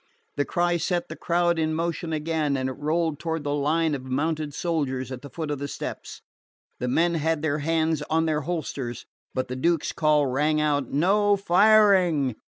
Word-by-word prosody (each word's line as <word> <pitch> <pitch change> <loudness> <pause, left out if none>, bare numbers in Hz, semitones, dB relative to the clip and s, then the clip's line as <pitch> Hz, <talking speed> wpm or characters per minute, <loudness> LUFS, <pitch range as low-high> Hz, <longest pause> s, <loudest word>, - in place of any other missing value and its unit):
The 145 - 0
cry 175 0 +1
set 175 +1 -1
the - - -6
crowd 170 -1 +1
in 155 0 0
motion 165 0 -2
again, 155 -2 -1
and 130 0 -1
it - - -4
rolled 155 +2 -1
toward 160 -2 -3
the 145 0 -1
line 155 +2 +1
of 140 - -3
mounted 150 +3 -2
soldiers 140 -6 -2
at 125 -1 -6
the 145 - -10
foot 155 -1 -5
of 145 - -3
the 140 - -3
steps. - - -7 0.6
The 125 - -2
men 170 +7 +2
had 160 -1 0
their 150 -1 0
hands 160 0 0
on 160 +1 +2
their 155 -1 0
holsters; 140 -6 -4 0.3
but 130 - -1
the 125 - -5
Duke's 165 +4 0
call 150 -2 +2
rang 150 +4 +1
out: 145 -4 0
"No 200 +7 +3
firing!" 190 - +4
155 Hz, 190 wpm, -25 LUFS, 145-170 Hz, 0.6 s, firing